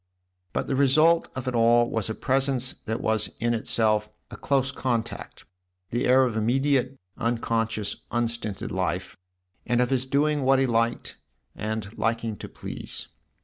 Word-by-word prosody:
But -, -, -1 dB
the 135 Hz, -, -1 dB
result 155 Hz, +5 st, +4 dB
of 130 Hz, -1 st, -5 dB
it 130 Hz, -, -1 dB
all 120 Hz, 0 st, +4 dB
was 110 Hz, -3 st, -2 dB
a 110 Hz, -, -3 dB
presence 130 Hz, -1 st, +1 dB
that 110 Hz, +1 st, -2 dB
was 110 Hz, -1 st, +1 dB
in 120 Hz, +1 st, +1 dB
itself 110 Hz, -2 st, +1 dB, 0.2 s
a -, -, -7 dB
close 135 Hz, -2 st, 0 dB
contact, 120 Hz, -4 st, -3 dB, 0.5 s
the 120 Hz, +2 st, 0 dB
air 130 Hz, +1 st, +6 dB
of 120 Hz, -3 st, 0 dB
immediate, 130 Hz, +3 st, +1 dB, 0.2 s
unconscious, 115 Hz, -2 st, -1 dB
unstinted 115 Hz, -3 st, -2 dB
life, -, -, -2 dB, 0.5 s
and 120 Hz, 0 st, +1 dB
of 125 Hz, +1 st, +1 dB
his 130 Hz, 0 st, +1 dB
doing 145 Hz, +2 st, +2 dB
what 135 Hz, 0 st, +4 dB
he 135 Hz, -, +3 dB
liked 115 Hz, -1 st, 0 dB, 0.4 s
and 110 Hz, 0 st, -4 dB
liking 115 Hz, 0 st, 0 dB
to -, -, -8 dB
please. -, -, -5 dB
120 Hz, 150 wpm, -26 LUFS, 115-130 Hz, 0.5 s, air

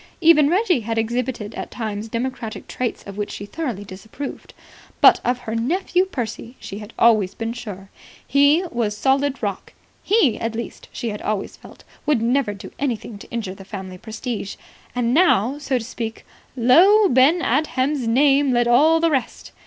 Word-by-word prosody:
Even 315 Hz, -4 st, +6 dB
Reggie 365 Hz, -, +2 dB
had 225 Hz, 0 st, -4 dB
exhibited 230 Hz, -1 st, -2 dB
at -, -, -6 dB
times 215 Hz, -1 st, -5 dB
democratic 230 Hz, -1 st, -4 dB
traits 250 Hz, -2 st, -3 dB
of 200 Hz, 0 st, -10 dB
which 205 Hz, -, -2 dB
she 205 Hz, -, -7 dB
thoroughly 240 Hz, -, -4 dB
disapproved. 205 Hz, +8 st, -9 dB, 0.4 s
But -, -, +7 dB
of 245 Hz, 0 st, +1 dB
her 220 Hz, -2 st, -5 dB
nephew 355 Hz, +10 st, +1 dB
Percy 240 Hz, -, -5 dB
she 200 Hz, -, -7 dB
had 210 Hz, +1 st, -10 dB
always 215 Hz, -5 st, +3 dB
been 225 Hz, 0 st, -3 dB
sure. 200 Hz, -5 st, -9 dB, 0.4 s
He 285 Hz, +5 st, +4 dB
was 215 Hz, -3 st, -1 dB
solid 270 Hz, +2 st, +1 dB
rock. 200 Hz, -2 st, -4 dB, 0.3 s
He, 380 Hz, -, +2 dB
at 225 Hz, 0 st, -3 dB
least, 235 Hz, -, -7 dB
she 235 Hz, -, -4 dB
had 210 Hz, -1 st, -6 dB
always 210 Hz, -2 st, -3 dB
felt, -, -, -16 dB, 0.2 s
would 295 Hz, -5 st, +3 dB
never 235 Hz, -2 st, +1 dB
do 200 Hz, -, -10 dB
anything 230 Hz, -6 st, -3 dB
to -, -, -13 dB
injure 220 Hz, -5 st, -4 dB
the 195 Hz, -, -12 dB
family 190 Hz, -2 st, -8 dB
prestige. 220 Hz, -1 st, -5 dB, 0.4 s
And 245 Hz, -1 st, +1 dB
now, 285 Hz, -, +3 dB
so 275 Hz, -3 st, -1 dB
to 230 Hz, -, -5 dB
speak, 225 Hz, -2 st, -6 dB, 0.3 s
"Lo, 365 Hz, -, +6 dB
Ben 300 Hz, +5 st, +4 dB
Adhem's 265 Hz, -1 st, 0 dB
name 275 Hz, +2 st, +3 dB
led 240 Hz, 0 st, +2 dB
all 305 Hz, +7 st, +5 dB
the 330 Hz, 0 st, +2 dB
rest." 265 Hz, -5 st, -3 dB
240 Hz, 170 wpm, -21 LUFS, 215-280 Hz, 0.4 s, But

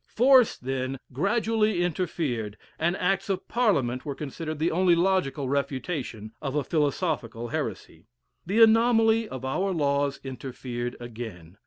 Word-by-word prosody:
Force, 255 Hz, 0 st, +5 dB
then, 130 Hz, +1 st, -3 dB, 0.2 s
gradually 215 Hz, -, +1 dB
interfered, 145 Hz, -, -2 dB, 0.2 s
and 170 Hz, +3 st, +1 dB
acts 195 Hz, +2 st, 0 dB
of 195 Hz, -, -2 dB
Parliament 140 Hz, -, +1 dB
were 140 Hz, -2 st, -4 dB
considered 155 Hz, +2 st, -5 dB
the 160 Hz, +3 st, +1 dB
only 180 Hz, +1 st, +4 dB
logical 170 Hz, -7 st, +1 dB
refutation 135 Hz, -, -3 dB
of 140 Hz, -2 st, -3 dB
a 150 Hz, -, +1 dB
philosophical 140 Hz, -6 st, -1 dB
heresy. 80 Hz, -4 st, -5 dB, 0.4 s
The 210 Hz, +6 st, +4 dB
anomaly 225 Hz, 0 st, +4 dB
of 130 Hz, 0 st, -6 dB
our 185 Hz, +9 st, 0 dB
laws 140 Hz, -4 st, 0 dB
interfered 125 Hz, -2 st, -5 dB
again. 110 Hz, -7 st, -8 dB
150 Hz, 130 wpm, -26 LUFS, 130-190 Hz, 0.4 s, Force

